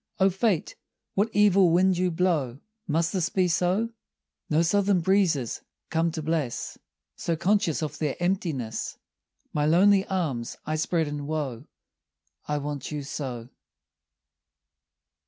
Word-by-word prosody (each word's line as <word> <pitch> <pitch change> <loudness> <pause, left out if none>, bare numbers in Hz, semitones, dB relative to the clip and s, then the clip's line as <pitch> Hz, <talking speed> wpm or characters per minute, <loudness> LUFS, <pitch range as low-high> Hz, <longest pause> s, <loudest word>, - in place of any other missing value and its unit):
O 190 0 +4
Fate, 195 -3 0 0.4
what 205 +3 +1
evil 200 -3 +5
wind 185 +3 +4
you 180 +1 +1
blow. 160 -8 0 0.3
Must 165 +1 +1
this 185 -2 0
be 185 -2 +2
so? 180 +6 +1 0.6
No 160 +2 +3
southern 195 +1 +2
breezes 170 - +1 0.3
come 165 0 +2
to 160 -2 -4
bless, 155 -6 -2 0.4
So 170 - -1
conscious 175 -2 +1
of 150 -1 -5
their 150 -4 -1
emptiness 165 - -2 0.6
My 150 0 +1
lonely 190 +4 +5
arms 150 -12 -2
I 155 - -1
spread 160 0 0
in 145 -1 -5
woe, 145 -7 -3 0.8
I 150 - 0
want 145 -2 -4
you 150 -1 -3
so. 125 -4 -5
165 Hz, 130 wpm, -26 LUFS, 150-190 Hz, 0.8 s, evil